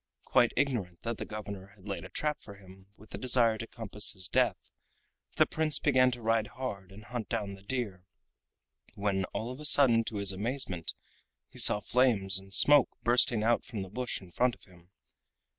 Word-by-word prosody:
Quite 120 -2 +3
ignorant 120 -11 -1
that 115 -1 -4
the - - -4
governor 100 -2 -8
had 100 -1 -17
laid 100 -4 -4
a - - -10
trap 150 -1 -2
for 100 - -12
him 95 -1 -17
with 110 - -18
the - - -6
desire 120 -3 +2
to 115 - -6
compass 105 -3 -1
his 95 -2 -3
death, - - 0 0.6
the - - +5
Prince 155 -1 +1
began 130 -3 +3
to 120 -2 -7
ride 110 -1 +1
hard 100 -8 -5
and 105 +3 -13
hunt 115 -1 -6
down 105 -4 -3
the 95 - -13
deer, 100 -4 -4 0.9
when 100 -2 -1
all 115 +5 -5
of 130 - -9
a - - -9
sudden 125 -6 +6
to 110 - -6
his 100 -1 +1
amazement 100 - -2 0.5
he - - -10
saw 105 - +6
flames 100 -7 +2
and 95 0 -15
smoke 145 +5 +5
bursting 120 -2 +3
out 120 +1 +2
from 110 -5 -6
the 95 - -10
bush 125 +4 -3
in 90 -2 -15
front 125 +5 +1
of - - -27
him. 90 -2 -20
110 Hz, 195 wpm, -30 LUFS, 95-125 Hz, 0.9 s, sudden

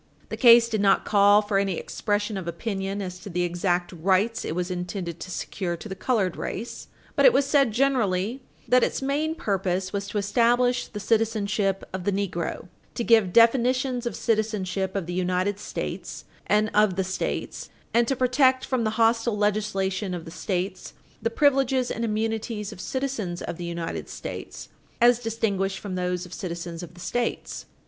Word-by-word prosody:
The - - -3
case 235 -2 +7
did 220 -3 -1
not 200 - +3
call 205 0 +5
for 205 -1 +1
any 195 -3 0
expression 210 0 -2
of 190 -3 -5
opinion 195 +2 -3
as 180 -1 -6
to 195 - -9
the 180 0 -1
exact 175 0 0
rights 190 +6 +1
it 160 - -3
was 180 +1 -2
intended 180 -1 -4
to - - -7
secure 175 -1 -3
to 215 - -9
the 190 - -5
colored 200 -3 0
race, 235 - -5 0.3
but - - +3
it - - +9
was 280 - +2
said 275 -4 +3
generally 235 -2 +1 0.3
that 250 0 +5
its - - -1
main 300 +4 0
purpose 190 - -1
was 200 0 -2
to 210 - -4
establish 245 +4 +2
the 210 - -7
citizenship 210 -2 0
of 190 -1 -4
the 200 - +1
negro, 190 -5 -3 0.3
to 235 - -1
give 220 -5 +4
definitions 250 +2 +3
of - - -4
citizenship 200 -4 -1
of 195 -4 -1
the 175 - -5
United 185 +2 0
States - - -5 0.2
and 210 +1 +2
of 210 -3 +4
the 190 - 0
States, 185 +1 -4 0.2
and 235 0 +3
to 270 - +1
protect 260 +1 +3
from 255 -3 0
the 220 0 -1
hostile 230 -1 +2
legislation 200 -2 0
of 170 -2 -7
the 165 - -9
States 185 +1 -3 0.3
the 230 - +1
privileges 265 -1 +2
and 230 - -3
immunities 220 -1 -2
of 180 - -9
citizens 225 -7 -3
of - - -5
the 175 - -5
United 170 -1 -4
States, - - -7 0.3
as 240 0 +5
distinguished 205 -4 -1
from 200 -3 -6
those 180 0 -2
of 180 - -11
citizens 170 -2 -5
of 175 -1 -10
the - - -14
States. 240 +6 -3
205 Hz, 180 wpm, -25 LUFS, 185-235 Hz, 0.3 s, it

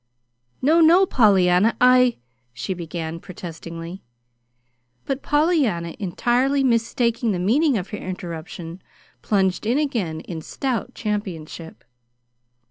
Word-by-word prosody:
"No, 315 +5 +4
no, 345 +4 +6
Pollyanna, 200 - +3
I 250 -1 +5 0.2
" 120 0 -46
she 190 - -3
began, 165 -1 -5
protestingly. 170 0 -8 1.0
But 275 0 -2
Pollyanna, 290 - +1
entirely 245 +8 +1
mistaking 235 -2 +1
the - - -1
meaning 250 - +2
of 190 -1 -5
her 210 - -5
interruption, 175 -1 -7 0.4
plunged 190 -3 +1
in 240 +4 +2
again 215 - -1
in 165 -3 -7
stout 250 - -3
championship. 180 -6 -5
205 Hz, 110 wpm, -22 LUFS, 170-250 Hz, 1.0 s, no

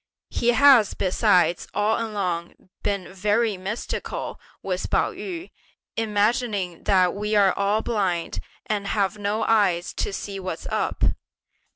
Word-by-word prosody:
He 235 - -1
has 255 -5 +6
besides 185 -2 +2
all 215 +2 +1
along 185 -5 -4
been 195 -2 -2
very 210 +3 +1
mystical 195 +5 -4 0.2
with - - -2
Pao - - +2
yü, 355 -1 -7 0.4
imagining 210 -4 0
that 185 -3 +4
we 210 +1 -2
are 200 -2 +5
all 205 +2 +1
blind, 190 -7 -1 0.3
and 205 -2 -2
have 200 -1 0
no 205 +2 -1
eyes 195 -7 +2
to - - -1
see 195 0 -5
what's 185 -1 -5
up! - - -1
205 Hz, 130 wpm, -24 LUFS, 185-220 Hz, 0.4 s, has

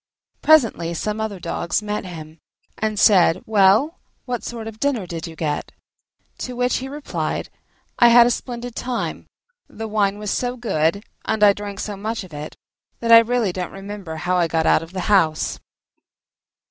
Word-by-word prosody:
Presently 230 - +3
some 210 +5 -2
other 210 -3 -4
dogs 175 +4 -2
met 210 -1 -3
him, 160 -3 -9 0.4
and 215 -1 -1
said, 185 -5 +5
"Well, 215 - +3 0.3
what 245 -2 -3
sort 230 -2 -6
of 225 - -6
a - - -20
dinner 265 -8 0
did 170 -1 -6
you 165 - -10
get?" 150 -2 -3 0.7
To 250 - -5
which 250 +1 +1
he 260 - -5
replied, 290 +1 -4 0.5
"I 240 - +8
had 235 0 +8
a 245 - +2
splendid 245 0 -5
time: 245 -1 -4 0.4
the 225 - -7
wine 205 -2 +1
was 210 -1 -4
so 250 0 -2
good, 200 -4 0 0.2
and 220 -1 0
I 205 -1 +7
drank 200 -1 -7
so 210 - -4
much 215 +2 -4
of 180 -4 -13
it, 150 +1 -7 0.4
that 230 0 0
I 230 - +11
really 230 -4 0
don't 180 -1 -4
remember 195 -4 -7
how 180 +3 -1
I 175 -1 +2
got 160 0 0
out - - +4
of 165 +1 -10
the 185 0 -4
house!" 170 -7 +2
210 Hz, 180 wpm, -21 LUFS, 175-235 Hz, 0.7 s, I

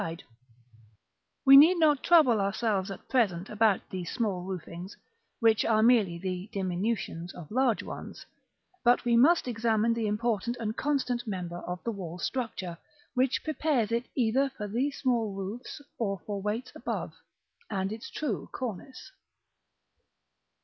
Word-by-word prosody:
We 275 0 +10
need 320 +6 +8
not 300 -4 +4
trouble 280 -11 +5
ourselves 200 -1 0
at 195 - -9
present 200 -8 +1
about 215 -2 +2
these 180 -2 -4
small 205 -7 -1
roofings, 180 0 -7 0.4
which 225 -1 +4
are 220 -1 +3
merely 220 -8 +4
the 185 +2 -4
diminutions 185 -2 -2
of 160 -4 -10
large 250 -1 +2
ones; - - -8 0.6
but 245 0 +4
we 240 -1 +3
must 290 +6 +5
examine 225 -1 +1
the 230 -2 -1
important 230 +2 -1
and 220 -1 -3
constant 255 -4 -1
member 180 -4 -4
of 180 0 -6
the 230 - -1
wall 180 -5 -6
structure, 190 -6 -4 0.3
which 260 +1 +1
prepares 300 -7 0
it 235 +1 -1
either 260 +2 +2
for 215 -6 -6
these 260 +7 -1
small 230 -6 0
roofs 200 +9 -6 0.2
or 200 -4 -1
for 205 -2 -4
weights 215 +5 -3
above, - - -4 0.6
and 190 +1 -2
is 220 - -4
its 310 - -9
true 290 -8 -3
cornice. 255 - -6
225 Hz, 140 wpm, -29 LUFS, 195-250 Hz, 0.6 s, We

